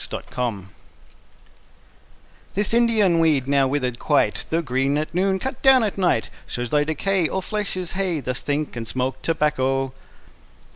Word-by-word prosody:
] -, -, -12 dB
Part -, -, -6 dB
I 115 Hz, -6 st, -2 dB, 1.9 s
This 205 Hz, +2 st, +1 dB
Indian 220 Hz, -7 st, +3 dB
weed, 150 Hz, -5 st, +2 dB
now 140 Hz, -1 st, +3 dB
withered 130 Hz, -3 st, -1 dB
quite, -, -, +1 dB
Though 165 Hz, +1 st, 0 dB
green 135 Hz, +1 st, 0 dB
at 155 Hz, +1 st, -3 dB
noon, 190 Hz, +2 st, +1 dB
cut 265 Hz, +5 st, -5 dB
down 265 Hz, -2 st, +6 dB
at 210 Hz, -, -1 dB
night, 180 Hz, -, +1 dB, 0.2 s
Shows 120 Hz, -1 st, -4 dB
thy 150 Hz, -1 st, +3 dB
decay; 170 Hz, +3 st, 0 dB
All 190 Hz, -, -2 dB
flesh 210 Hz, -2 st, -2 dB
is 180 Hz, -2 st, -3 dB
hay: 185 Hz, -4 st, -1 dB
Thus 125 Hz, -1 st, -3 dB
think, 145 Hz, -1 st, -2 dB
and 115 Hz, -1 st, -5 dB
smoke 130 Hz, +2 st, -2 dB
tobacco. 135 Hz, -4 st, 0 dB
150 Hz, 160 wpm, -22 LUFS, 130-190 Hz, 1.9 s, down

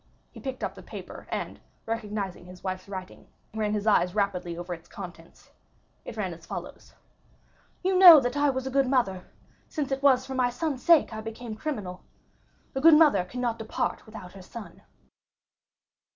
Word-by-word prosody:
He -, -, -12 dB
picked 265 Hz, -2 st, -5 dB
up -, -, -2 dB
the -, -, -12 dB
paper, -, -, -10 dB
and, -, -, -4 dB, 0.3 s
recognizing 210 Hz, -5 st, -4 dB
his 180 Hz, 0 st, -13 dB
wife's 185 Hz, 0 st, -4 dB
writing, 185 Hz, -2 st, -8 dB, 0.3 s
ran 215 Hz, -1 st, -1 dB
his 205 Hz, 0 st, -2 dB
eyes 180 Hz, -3 st, +3 dB
rapidly 180 Hz, -4 st, -1 dB
over 175 Hz, +1 st, -5 dB
its 170 Hz, 0 st, -11 dB
contents; 170 Hz, -2 st, -11 dB, 0.5 s
it -, -, -8 dB
ran -, -, -2 dB
as -, -, -14 dB
follows: -, -, -8 dB, 0.9 s
"You 375 Hz, +1 st, +2 dB
know 345 Hz, -5 st, +12 dB
that 245 Hz, 0 st, -2 dB
I 290 Hz, 0 st, +3 dB
was 260 Hz, -1 st, -2 dB
a 265 Hz, -, -3 dB
good 270 Hz, 0 st, +3 dB
mother, 200 Hz, -9 st, +1 dB, 0.4 s
since 290 Hz, -4 st, -3 dB
it 270 Hz, 0 st, -1 dB
was 260 Hz, -2 st, +4 dB
for 265 Hz, -, -6 dB
my 255 Hz, -1 st, +2 dB
son's 275 Hz, +1 st, -3 dB
sake 330 Hz, -7 st, +5 dB
I 220 Hz, -, -5 dB
became 225 Hz, +1 st, -7 dB
criminal. 210 Hz, -9 st, -5 dB, 0.7 s
A 265 Hz, -, -2 dB
good 325 Hz, +1 st, +8 dB
mother 295 Hz, -, +5 dB
cannot 240 Hz, +2 st, -3 dB
depart 220 Hz, 0 st, -3 dB
without 215 Hz, -5 st, -10 dB
her 195 Hz, -, -12 dB
son." 215 Hz, +4 st, -10 dB
225 Hz, 175 wpm, -27 LUFS, 190-265 Hz, 0.9 s, know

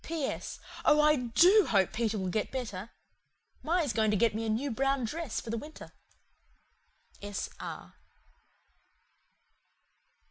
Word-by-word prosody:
"P.S. 315 Hz, -4 st, -4 dB, 0.2 s
Oh 300 Hz, 0 st, +5 dB
I 300 Hz, 0 st, +5 dB
DO 330 Hz, -, +5 dB
hope 195 Hz, -4 st, +2 dB
Peter 220 Hz, -1 st, -1 dB
will 190 Hz, -2 st, -2 dB
get 210 Hz, +4 st, -1 dB
better. 225 Hz, -6 st, -5 dB, 0.7 s
Ma 345 Hz, +3 st, +1 dB
is 285 Hz, -7 st, -1 dB
going 220 Hz, -1 st, +2 dB
to 210 Hz, -, +2 dB
get 230 Hz, +1 st, +3 dB
me 225 Hz, +1 st, -3 dB
a -, -, -1 dB
new 250 Hz, +6 st, -1 dB
brown 270 Hz, +2 st, 0 dB
dress 300 Hz, +1 st, -3 dB
for 225 Hz, -, -7 dB
the 230 Hz, -, -2 dB
winter. 305 Hz, +4 st, -11 dB, 1.3 s
"S. 205 Hz, -1 st, -4 dB
R." -, -, -8 dB
235 Hz, 140 wpm, -30 LUFS, 215-300 Hz, 1.3 s, Oh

